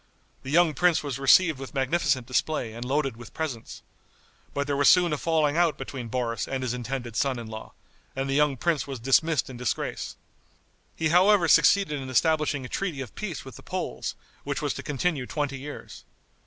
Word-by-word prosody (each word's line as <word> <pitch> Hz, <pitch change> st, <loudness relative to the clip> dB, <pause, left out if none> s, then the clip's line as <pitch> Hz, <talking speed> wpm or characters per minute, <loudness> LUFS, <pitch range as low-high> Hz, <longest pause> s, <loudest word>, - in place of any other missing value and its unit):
The 130 Hz, -, -8 dB
young 165 Hz, +1 st, +4 dB
prince 175 Hz, -1 st, +2 dB
was 135 Hz, -3 st, -4 dB
received 155 Hz, +2 st, +5 dB
with 135 Hz, +2 st, -8 dB
magnificent 135 Hz, -1 st, +1 dB
display 125 Hz, -2 st, -1 dB
and 120 Hz, +1 st, -6 dB
loaded 135 Hz, -1 st, -1 dB
with 120 Hz, -2 st, -12 dB
presents. 145 Hz, -8 st, -5 dB, 0.7 s
But 140 Hz, -, -2 dB
there 145 Hz, -1 st, -1 dB
was 140 Hz, 0 st, +5 dB
soon 175 Hz, -3 st, +5 dB
a -, -, 0 dB
falling 155 Hz, -3 st, +1 dB
out 170 Hz, -3 st, +3 dB
between 125 Hz, -4 st, -6 dB
Boris 115 Hz, -2 st, -2 dB
and 130 Hz, -1 st, -3 dB
his 125 Hz, -2 st, -1 dB
intended 120 Hz, -1 st, -5 dB
son 135 Hz, 0 st, +1 dB
in 120 Hz, -, -6 dB
law, 110 Hz, 0 st, -9 dB, 0.4 s
and 135 Hz, +1 st, -2 dB
the 135 Hz, -, -1 dB
young 145 Hz, -1 st, +2 dB
prince 160 Hz, +2 st, 0 dB
was 135 Hz, -3 st, -5 dB
dismissed 145 Hz, +5 st, +2 dB
in 130 Hz, -, -9 dB
disgrace. 125 Hz, 0 st, -3 dB, 0.8 s
He 160 Hz, -1 st, 0 dB
however 185 Hz, +1 st, +5 dB
succeeded 150 Hz, -2 st, +4 dB
in 130 Hz, -, -7 dB
establishing 150 Hz, 0 st, +1 dB
a -, -, -5 dB
treaty 175 Hz, -1 st, -3 dB
of 130 Hz, -, -8 dB
peace 185 Hz, -11 st, -5 dB
with 130 Hz, -, -10 dB
the -, -, -12 dB
Poles, -, -, -4 dB, 0.3 s
which -, -, -3 dB
was -, -, -1 dB
to -, -, -6 dB
continue 150 Hz, -2 st, -1 dB
twenty 145 Hz, -3 st, -3 dB
years. 145 Hz, +2 st, -9 dB
140 Hz, 195 wpm, -26 LUFS, 130-160 Hz, 0.8 s, received